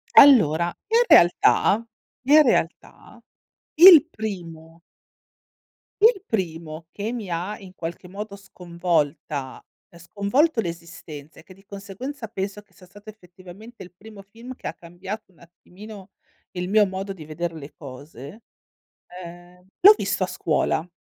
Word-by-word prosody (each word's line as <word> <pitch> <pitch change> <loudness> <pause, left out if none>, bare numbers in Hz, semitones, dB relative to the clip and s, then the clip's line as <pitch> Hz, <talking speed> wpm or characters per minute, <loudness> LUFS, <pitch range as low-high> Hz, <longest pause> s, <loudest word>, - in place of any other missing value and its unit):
Allora, 170 - +6 0.2
in 455 +3 +3
realtà, 200 +5 +4 0.4
in 300 +2 +7
realtà 200 - -3 0.6
il 335 -2 +9
primo 170 -6 -8 1.2
il 435 -3 +4
primo 165 -5 -4
che 210 +2 -5
mi 235 -5 -6
ha 180 +5 -4
in 190 -2 -14
qualche 170 0 -8
modo 200 +2 -8
sconvolta, 165 -7 -4 0.3
ehm, 170 - -18
sconvolto 225 - 0
l'esistenza 165 -4 -10
e - - -16
che 185 - -17
di 195 +1 -23
conseguenza 205 +7 -8
penso 200 -1 -6
che 205 - -34
sia 185 - -18
stato 205 +4 -15
effettivamente 190 +3 -15
il 180 - -11
primo 205 +2 -14
film 230 +6 -12
che - - -9
ha - - -4
cambiato 185 +5 -9
un 170 - -28
attimino 190 +4 -14 0.4
il 180 0 -5
mio 210 +1 +4
modo 195 +1 -6
di 165 -5 -12
vedere 165 +2 -5
le 150 -2 -11
cose, 140 - -12 0.6
ehm, 175 0 -13
l'ho 410 +3 +8
visto - - -2
a - - -2
scuola. 160 +3 -2
185 Hz, 135 wpm, -23 LUFS, 170-215 Hz, 1.2 s, il